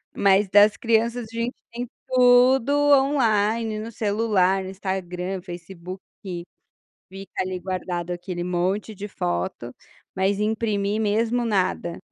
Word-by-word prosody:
mas 200 +1 +4
das 205 +1 +6
crianças 230 0 +1
a - - -11
gente 235 +2 -2 0.2
tem 240 +1 -5 0.2
tudo 255 +1 +5 0.2
online, 225 -5 +2
no 225 +2 -6
celular, 205 -3 +1
no 185 - -6
Instagram, 190 -1 -4
Facebook, 180 +1 -9 0.2
fi 175 -3 -5 0.7
fica 195 +1 -7
ali 185 0 -4
guardado 180 -1 -4
aquele 175 0 -5
monte 180 +5 -1
de 205 +1 -6
foto, 90 - -3 0.4
mas 195 +2 +1
imprimir 215 -1 0
mesmo, 225 +3 +1
nada, 185 -5 -1
200 Hz, 125 wpm, -24 LUFS, 185-230 Hz, 0.7 s, das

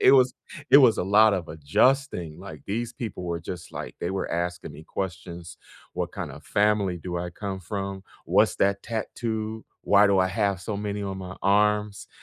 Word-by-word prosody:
it - - +7
was 130 -1 +5 0.4
it 140 - +10
was 125 -6 +6
a - - 0
lot 105 +2 +6
of 90 -3 -3
adjusting, 80 - +1
like, 80 -7 -10
these 115 +4 -2
people 110 -6 -6
were 85 -1 -3
just, 90 +1 -7
like, - - -6
they 85 - -2
were 95 - -3
asking 85 -1 -3
me 75 +2 -12
questions: 90 -2 -6 0.3
what - - -4
kinda - - -6
family 100 -3 +1
do 90 0 -4
I 90 0 -4
come 95 +1 -5
from, 95 +2 -4 0.2
what's - - +3
that 100 0 +1
tattoo, 110 -1 -3 0.2
why 100 0 +6
do 100 -1 +3
I 95 - +3
have 100 -1 0
so 105 +3 -4
many 105 0 -3
on 95 -1 -4
my 95 0 -7
arms, 105 +1 +2
100 Hz, 185 wpm, -26 LUFS, 90-105 Hz, 0.4 s, it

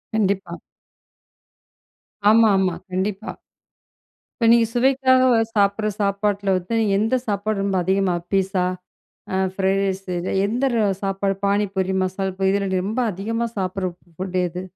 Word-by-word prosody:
கண்டிப்பா. 200 -2 0 1.8
ஆமாமா. 200 -5 +4 0.2
கண்டிப்பா. 195 +3 -2 1.1
இப்ப 230 - +3
நீங்க 230 -1 +5
சுவைக்காக 260 +1 +3 0.3
சாப்பிட்ற 205 +1 +2
சாப்பாட்டில 200 0 0
வந்து, 185 +5 -5
நீங்க 210 -3 +1
எந்த 225 +4 +1
சாப்பாடு 205 0 -1
ரொம்ப 195 -1 -1
அதிகமா 190 0 +1 0.2
பீஸா, 195 -1 +1 0.9
ஃப்ரைட் 195 0 +1
ரைஸ், 195 0 -2 0.4
எந்த 230 -2 +1
சாப்பாடு 195 0 -1
பானிபூரி, 200 -2 0
மசால் 190 0 -3
பூரி 190 0 +2
இதில 200 0 0
நீ - - +1
ரொம்ப 225 +5 -1
அதிகமா 225 +5 -2
சாப்பிடுற 185 0 -2 0.3
ஃபுட் 185 +1 -3
எது? 180 +1 -6
200 Hz, 120 wpm, -22 LUFS, 190-215 Hz, 1.8 s, நீங்க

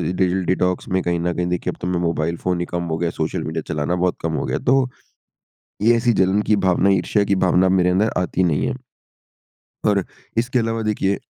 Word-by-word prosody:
Diesel 95 0 +1
detox 90 0 0
में 95 0 +1
कहीं 85 -1 0
न 85 +1 -1
कहीं 90 +1 -1
देखिए 90 0 -1
अब - - -15
तो 90 - -2
मैं 90 -1 0
मोबाइल 85 0 -1
फ़ोन 90 -1 -1
ही 85 - -1
कम 85 0 -3
हो 80 -2 -2
गया 85 +1 -1
है, 85 - -2
सोशल 80 - -2
मीडिया 80 +1 -3
चलाना 75 +4 -1
बहुत 90 0 0
कम 80 0 -2
हो - - -2
गया। - - -1
तो, 130 0 +2 0.9
ये 115 +2 +5
ऐसी 120 0 +2
जलन 95 +3 +2
की 105 - +6
भावना, 95 0 +2
ईर्ष्या 100 +2 +2
की 100 0 +1
भावना 90 +1 +3
मेरे 90 -1 +3
अंदर 100 +5 +2
आती 90 0 0
नहीं 80 -5 +1
है। - - -1 1.1
और 100 -2 +3 0.3
इसके 125 +2 +1
अलावा 115 0 -1
देखिए 100 -2 0
90 Hz, 220 wpm, -21 LUFS, 85-100 Hz, 1.1 s, की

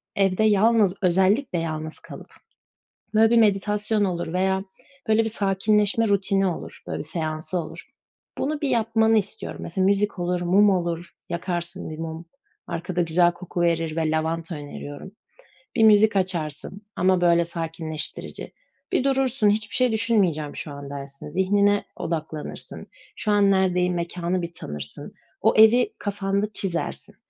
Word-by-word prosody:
evde 195 +1 +2
yalnız 215 -2 +4
özellikle 190 +4 +2
yalnız 155 -1 -4
kalıp, - - -11 0.8
böyle, 220 +1 +5
bir 235 - +5
meditasyon 210 0 +2
olur 175 -3 -3
veya, 190 +1 +1 0.4
böyle, 220 +1 +3
bir 225 - -1
sakinleşme 210 +1 +1
rutini 195 -1 +2
olur, 175 - -6
böyle, - - -4
bir - - -4
seansı 155 +1 -1
olur. 165 -3 -7 0.5
Bunu 295 +2 -2
bir 285 - 0
yapmanı 225 -2 +2
istiyorum. 215 +1 -3
Mesela 185 +3 -1
müzik 200 0 +1
olur, 175 0 -1
mum 195 +4 +4
olur, 175 -2 -1 0.2
yakarsın 175 -1 -2
bir 155 - -7
mum, 165 +1 -6 0.4
arkada 175 +1 -2
güzel 175 +1 +3
koku 175 0 -5
verir 165 -2 0
ve 160 -1 0
lavanta 165 +2 -2
öneriyorum. 145 +3 -8 0.6
Bir 225 - +3
müzik 215 -1 +6
açarsın 180 -1 -2
ama, 185 0 +2
böyle, 170 -1 +4
sakinleştirici. 165 -2 -5 0.4
Bir - - +1
durursun, 265 -5 +2
"Hiçbir 215 +1 -1
şey 255 -2 +3
düşünmeyeceğim 190 -10 +1
şu 150 - -3
an." 140 0 -8
dersin, 140 0 -5
zihnine 200 +4 +2
odaklanırsın, 155 -2 -5 0.3
"Şu 215 - 0
an 205 -1 +4
neredeyim?" 180 -2 +2
Mekânı 175 +1 -2
bir 170 0 -5
tanırsın, 75 -1 -6 0.3
o - - +4
evi 235 - +5
kafanda 200 0 -1
çizersin. 195 +2 0
185 Hz, 140 wpm, -24 LUFS, 165-210 Hz, 0.8 s, müzik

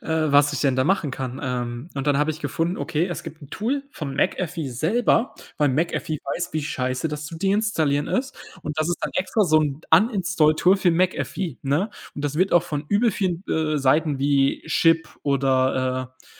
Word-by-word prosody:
äh, - - -12 0.2
was 145 +1 +5
ich 145 - -2
denn 135 -3 +2
da 130 - +2
machen 165 -4 +1
kann. 130 -1 -5
Ähm, 125 +1 -3
und 135 0 -3
dann 145 -1 +3
habe 150 +2 +2
ich 155 0 -6
gefunden, 165 +5 -1
okay, 160 +3 -1
es 175 -5 -5
gibt 155 +2 -10
'n 140 - -12
Tool 265 +6 -2
vom 140 -4 -5
McAfee 165 -3 -1
selber, 215 - +1 0.2
weil 150 -1 +3
McAfee 155 +2 -1 0.2
weiß, - - -3
wie 155 0 -1
scheiße 130 0 -2
das 150 0 -5
zu 165 - -8
deinstallieren 195 -7 +1
ist. 265 +1 -1 0.3
Und 150 +1 -5
das 155 - +1
ist 175 - -1
dann - - -2
extra 195 +3 +1
so 155 -3 +4
'n 145 -1 -2
Uninstall 190 -8 +3
Tool 185 +5 +4
für 190 -2 +2
McAfee, 180 -2 -1
ne? 150 +10 0 0.2
Und 145 - -5
das 145 0 -2
wird 185 +4 +2
auch 175 - +5
von 145 0 -4
übel 220 +3 +3
vielen, 185 -3 -2
äh, 155 -1 0
Seiten 145 +2 +2
wie 140 0 +2
Chip 165 +1 +3
oder, 130 -2 +1
äh, 130 - -25
155 Hz, 200 wpm, -23 LUFS, 140-180 Hz, 0.3 s, was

